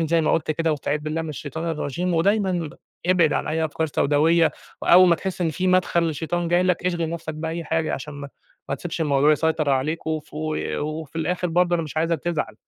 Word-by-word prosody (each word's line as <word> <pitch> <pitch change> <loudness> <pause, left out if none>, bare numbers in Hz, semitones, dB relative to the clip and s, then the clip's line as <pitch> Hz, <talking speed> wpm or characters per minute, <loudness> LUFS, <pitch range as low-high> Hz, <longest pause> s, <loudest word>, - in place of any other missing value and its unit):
ما - - 0
زي 165 +1 +3
ما 155 - +1
قُلت 160 - 0
كده 165 +1 0
واستعيذ 150 0 -2
بالله 155 +2 -3
من 160 - -6
الشيطان 155 +3 -4
الرجيم، 170 +3 -2
ودايمًا 195 +4 +2 0.6
اب 185 - +5
ابعد 155 -2 +3
عن - - -1
أي 160 +1 0
أفكار 160 +1 -2
سوداوية، 155 +3 +3 0.3
وأول 180 +1 +7
ما 170 - +5
تحس 185 +2 -5
إن 170 -2 +1
في 180 +4 -2
مدخل 185 -2 +3
للشيطان 165 +2 -2
جاي 175 +1 +3
لك، 180 0 0
اشغل 170 -3 -1
نَفْسَك 165 -2 -5
بأي 160 +2 -4
حاجة 160 0 0
عشان 145 +2 -7
ما 145 0 -7 0.4
ما - - 0
تسيبش 170 +4 -5
الموضوع 145 -1 +4
يسيطر 155 -1 +1
عليك، 145 +5 -1
وف 155 -2 -4
وفي 155 0 -3
الآخر 180 +2 -1
برضه 175 +1 +2
أنا 165 - -1
مش 155 - -9
عايزك 165 +1 +1
تزعل. 160 -10 -2
160 Hz, 215 wpm, -23 LUFS, 155-170 Hz, 0.6 s, وأول